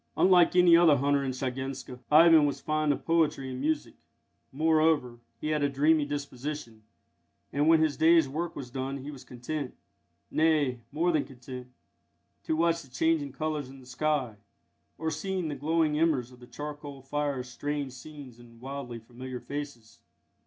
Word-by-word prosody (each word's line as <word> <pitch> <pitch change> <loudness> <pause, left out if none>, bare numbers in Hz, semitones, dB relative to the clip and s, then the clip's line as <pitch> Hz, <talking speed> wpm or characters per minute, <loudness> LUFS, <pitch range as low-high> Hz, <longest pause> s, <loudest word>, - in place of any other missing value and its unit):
Unlike 180 -2 +5
any 180 -2 +7
other 165 -4 +6
hunter 140 +1 +1
in 135 - -2
Shiganska, 130 0 -4
Ivan 160 -1 +7
was 140 - -3
fond 155 -1 0
of 145 - -3
poetry 155 -5 +1
and 130 0 -5
music; 155 +1 -1 0.6
moreover, 155 -4 +2 0.2
he 155 - -3
had 155 -1 0
a 145 - +2
dreamy 150 +2 +3
disposition, 140 -4 -5 0.7
and 145 +2 +2
when 160 -1 +6
his 155 -2 0
day's 165 -1 +5
work 160 +5 -4
was 125 -3 -7
done 135 +1 -4
he 145 - -6
was 135 -3 -11
content 130 +3 -5 0.6
nay, 155 -6 +2
more 170 +4 +1
than 155 -3 +1
content 125 -1 -10 0.8
to 160 - 0
watch 170 +1 +2
the 135 - -16
changing 150 +2 0
colours 150 -2 -3
in 135 0 -12
the 130 - -15
sky, 130 -3 -1 0.6
or 160 0 -2
see 190 +3 -3
in 170 -4 -2
the 145 - -3
glowing 155 +1 +1
embers 140 -7 +1
of 125 - -16
the 125 - -14
charcoal 145 -2 -8
fire 140 -1 -2
strange 140 +3 -4
scenes 130 -2 -11
and 115 -1 -16
wildly 130 -2 -6
familiar 125 +2 -8
faces. 140 -6 -7
145 Hz, 165 wpm, -28 LUFS, 130-155 Hz, 0.8 s, any